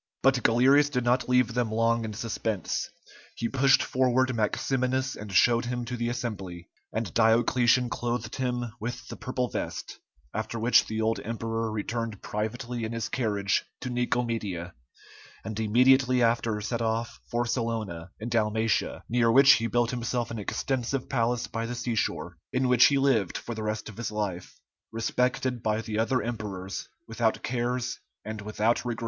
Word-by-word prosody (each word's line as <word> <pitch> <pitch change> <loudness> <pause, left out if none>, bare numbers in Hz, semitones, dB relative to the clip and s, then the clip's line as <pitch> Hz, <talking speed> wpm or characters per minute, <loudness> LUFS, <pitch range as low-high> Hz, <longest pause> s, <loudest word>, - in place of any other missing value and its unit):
But 135 -1 +4
Galerius 135 +6 +5
did 125 -4 -1
not 120 +1 +1
leave 125 -2 +3
them 120 -2 0
long 115 +1 +2
in 110 - -5
suspense; 110 -3 -2 0.5
he 115 - -2
pushed 135 +1 +4
forward 130 0 +2
Maximinus 130 +4 0
and 105 -1 -8
showed 120 +5 +4
him 120 0 -3
to 125 +1 -4
the 120 0 -1
assembly, 100 -8 -5 0.2
and 110 -5 -3
Diocletian 120 +2 +4
clothed 120 -1 -3
him 125 -2 -1
with 120 +3 -5
the - - -6
purple 125 -1 -2
vest, - - -5 0.3
after 110 +1 -3
which 115 +2 +4
the 110 0 -2
old 110 +1 +1
emperor 115 0 -3
returned 110 0 -3
privately 120 +3 -3
in 110 +1 -3
his 115 -1 -3
carriage 105 -6 0 0.2
to 125 - -4
Nicomedia, 115 -8 -1 0.7
and 110 0 -4
immediately 125 +3 +4
after 115 -2 +1
set 115 +2 -2
off 115 +1 -1
for 120 +1 0
Salona 110 -8 -2
in 115 +2 -4
Dalmatia, 110 -1 0
near 115 -1 +3
which 135 +3 +8
he 115 -3 +4
built 120 0 +1
himself 120 -1 -2
an 115 - -4
extensive 130 +4 -2
palace 120 -1 +1
by 115 0 -4
the 120 - -4
sea 120 0 -2
shore, 90 -5 -2
in 130 0 +1
which 125 -1 +6
he 140 - +4
lived 130 -9 +2
for 120 - -6
the 110 - -5
rest 110 0 -3
of 110 - -10
his 115 -2 -3
life, 100 -4 -4 0.3
respected 125 +2 0
by 110 0 0
the 110 -1 -3
other 115 +2 +1
emperors, 100 -5 -5 0.2
without 115 0 0
cares 125 0 -2 0.3
and 110 -1 -5
without 110 +2 0
regret. 120 -1 -3
115 Hz, 165 wpm, -27 LUFS, 110-125 Hz, 0.7 s, which